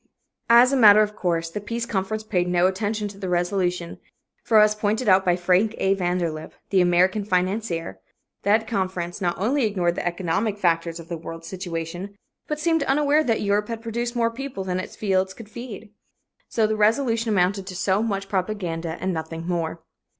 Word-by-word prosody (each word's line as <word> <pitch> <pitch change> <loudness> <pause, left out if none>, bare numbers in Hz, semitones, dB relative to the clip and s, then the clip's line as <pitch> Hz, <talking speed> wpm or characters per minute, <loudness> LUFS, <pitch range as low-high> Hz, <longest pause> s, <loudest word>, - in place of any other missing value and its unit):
'" - - -51
As 255 +2 +1
a - - +4
matter 215 -4 +8
of 210 0 -4
course, 165 -2 -1
the 205 - -4
Peace 230 +3 -3
Conference 215 0 -2
paid 180 -5 0
no 180 0 +2
attention 210 +3 -1
to 200 0 -12
the 190 -2 -4
resolution, 175 -1 -1 0.4
for, 220 -2 +4
as 210 0 +5
pointed 215 +3 -1
out 190 -1 +5
by 180 -2 +3
Frank 185 +5 +2
A. 190 - +2
Vanderlip, 175 -4 -2 0.2
the 190 -2 +4
American 180 +4 +3
financier, 180 - -1 0.4
that 215 +3 +2
conference 185 -3 -3
not 175 -2 0
only 250 +8 +1
ignored 185 -6 +1
the - - -4
economic 185 +4 -1
factors 170 -3 0
of 165 - -10
the 170 -2 -5
world 165 0 -8
situation, 175 +1 -5 0.3
but 300 -1 -3
seemed 325 0 +1
unaware 295 +2 +3
that 230 -6 0
Europe 205 +1 +1
had 230 -1 -5
produced 235 +1 -3
more 230 -1 +1
people 255 -4 -6
than 185 -1 -2
its 185 - -7
fields 190 -2 0
could 225 -3 -11
feed. 225 -3 -9 0.6
So 225 - +2
the 215 0 0
resolution 225 +2 +2
amounted 195 -1 +1
to 185 - -6
so 190 +2 +1
much 200 -3 -2
propaganda 180 -4 -3
and 185 0 -1
nothing 165 0 -5
more. 165 -2 -3
195 Hz, 185 wpm, -24 LUFS, 175-220 Hz, 0.6 s, matter